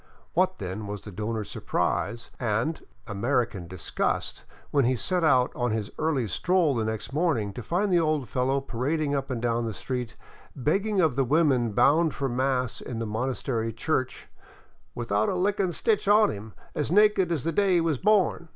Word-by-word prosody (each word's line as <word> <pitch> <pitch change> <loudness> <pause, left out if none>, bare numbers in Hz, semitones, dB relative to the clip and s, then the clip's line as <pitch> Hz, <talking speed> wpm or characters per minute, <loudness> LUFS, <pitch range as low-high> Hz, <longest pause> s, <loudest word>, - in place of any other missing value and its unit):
[What, 185 +2 +2
then, 100 +2 -5
was 100 -1 -5
the 105 - -9
donor's 105 +2 -4
surprise 115 0 -2
and 120 +7 -1 0.2
American 110 -3 -1
disgust 95 0 -3 0.3
when 140 -3 +3
he 130 +2 +2
set 180 +8 0
out 130 -5 +4
on 125 0 0
his 110 -2 -2
early 150 -7 0
stroll 170 - +2
next 110 +3 -4
morning 145 - 0
to 125 - -6
find 180 - 0
the 175 - +5
old 155 -5 0
fellow 130 +5 0
parading 140 +4 -1
up 135 -1 -2
and 125 -3 -2
down 120 0 0
the 110 - -4
street, 125 -1 -4 0.4
begging 195 - 0
of 160 -8 +3
the 135 - +2
women 130 -5 +2
bound 155 +8 +3
for 140 - -1
mass 130 -1 -1
in 120 - -6
the 115 - -2
monastery 115 0 -2
church 130 +3 -2 0.7
without 110 -3 0
a - - -1
lickin' 195 0 +1
stitch 210 +4 0
on 210 +1 +5
him, 105 +1 -9 0.2
as 150 0 -2
naked 205 -2 +4
as 160 -6 -1
the 165 - 0
day 195 +2 +2
he 170 - +4
was 160 -5 0
born. 190 -5 +2
130 Hz, 180 wpm, -27 LUFS, 115-165 Hz, 0.7 s, the